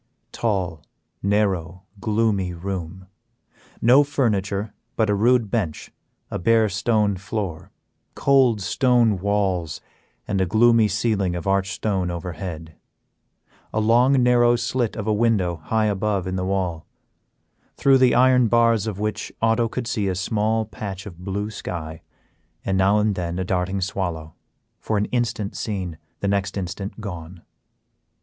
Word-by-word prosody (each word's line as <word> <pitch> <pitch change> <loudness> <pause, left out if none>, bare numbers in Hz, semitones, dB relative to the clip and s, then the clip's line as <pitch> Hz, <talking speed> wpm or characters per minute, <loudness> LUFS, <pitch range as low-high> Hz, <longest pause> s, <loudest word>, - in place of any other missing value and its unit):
Tall, 95 -8 -2 0.4
narrow, 95 -4 0 0.2
gloomy 105 -4 0
room; 95 0 -5 0.8
no 125 +5 +7
furniture 105 -7 -1 0.2
but 110 -2 +2
a - - +3
rude 115 +1 +2
bench 95 -10 -2 0.4
a - - -3
bare 110 +3 +3
stone 105 0 +1
floor, 100 -4 -5 0.5
cold 130 -6 +3
stone 120 0 +2
walls 95 -5 -1 0.5
and 95 - 0
a 95 - +1
gloomy 115 +2 +4
ceiling 100 -3 0
of 85 - -5
arched 95 -1 +1
stone 95 -4 -1
over 85 +1 -4
head; 80 -2 -7 1.0
a 110 - -1
long, 125 +4 +4
narrow 120 -1 +4
slit 120 -1 -1
of 110 - -4
a 110 - +1
window 105 -6 +1
high 110 -1 +1
above 100 -2 0
in 95 0 -3
the 90 0 -2
wall, 90 -4 -2 0.9
through 135 -1 +4
the 130 -1 +4
iron 125 -1 +5
bars 115 -2 +3
of 105 -4 -3
which 105 0 -3
Otto 115 +1 +2
could - - -4
see 115 -4 -1
a 95 - -1
small 110 +3 0
patch 100 -3 -7
of 90 -5 -10
blue 100 +3 -3
sky 80 -6 -6 0.6
and 95 - 0
now 95 +2 +3
and 105 0 +2
then 85 -2 -3
a 95 - -1
darting 95 +1 -1
swallow, 85 -5 -3 0.5
for 110 - -1
an 105 - +1
instant 115 -4 -1
seen, 90 -7 -4 0.2
the 100 - 0
next 100 0 -1
instant 95 +3 -5
gone. 90 -3 -8
100 Hz, 145 wpm, -23 LUFS, 95-115 Hz, 1.0 s, no